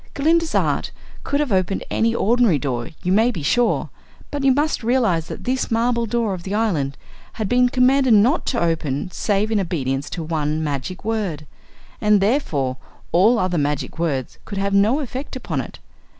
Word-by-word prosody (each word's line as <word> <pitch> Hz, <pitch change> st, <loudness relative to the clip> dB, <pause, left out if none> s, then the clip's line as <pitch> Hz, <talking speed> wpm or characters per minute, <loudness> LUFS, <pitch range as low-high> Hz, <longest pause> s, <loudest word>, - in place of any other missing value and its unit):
Glinda's 325 Hz, +3 st, +2 dB
art -, -, +1 dB, 0.3 s
could 285 Hz, -, -1 dB
have 295 Hz, -5 st, -1 dB
opened 190 Hz, 0 st, 0 dB
any 230 Hz, +1 st, +1 dB
ordinary 235 Hz, -6 st, +3 dB
door, 125 Hz, -3 st, -3 dB
you 180 Hz, -, 0 dB
may 220 Hz, +5 st, +4 dB
be 175 Hz, -11 st, -4 dB
sure, 240 Hz, +11 st, +1 dB, 0.4 s
but 285 Hz, -1 st, -3 dB
you 270 Hz, -, +5 dB
must 290 Hz, -1 st, 0 dB
realize 225 Hz, -9 st, +1 dB
that -, -, -7 dB
this 255 Hz, +1 st, -1 dB
marble 235 Hz, 0 st, +1 dB
door 225 Hz, -2 st, 0 dB
of 180 Hz, -, -6 dB
the 195 Hz, +3 st, -4 dB
island 160 Hz, -12 st, 0 dB, 0.4 s
had 215 Hz, -3 st, -3 dB
been 250 Hz, +3 st, +3 dB
commanded 255 Hz, -1 st, +4 dB
not 240 Hz, +10 st, +3 dB
to 240 Hz, -, 0 dB
open 165 Hz, -1 st, -1 dB
save 210 Hz, +3 st, 0 dB
in 215 Hz, -, +2 dB
obedience 145 Hz, -6 st, -2 dB
to 170 Hz, -, -5 dB
one 155 Hz, -1 st, -1 dB
magic 150 Hz, +6 st, -4 dB
word, 200 Hz, -9 st, -2 dB, 0.6 s
and 210 Hz, -1 st, +4 dB
therefore 165 Hz, -, 0 dB, 0.3 s
all 210 Hz, +8 st, +4 dB
other 185 Hz, -5 st, 0 dB
magic 145 Hz, +2 st, -2 dB
words 140 Hz, -7 st, -2 dB
could 200 Hz, -, -7 dB
have 200 Hz, 0 st, -1 dB
no 215 Hz, +9 st, +3 dB
effect 265 Hz, +1 st, -6 dB
upon 165 Hz, -, -3 dB
it. -, -, -10 dB
205 Hz, 180 wpm, -21 LUFS, 160-245 Hz, 0.6 s, you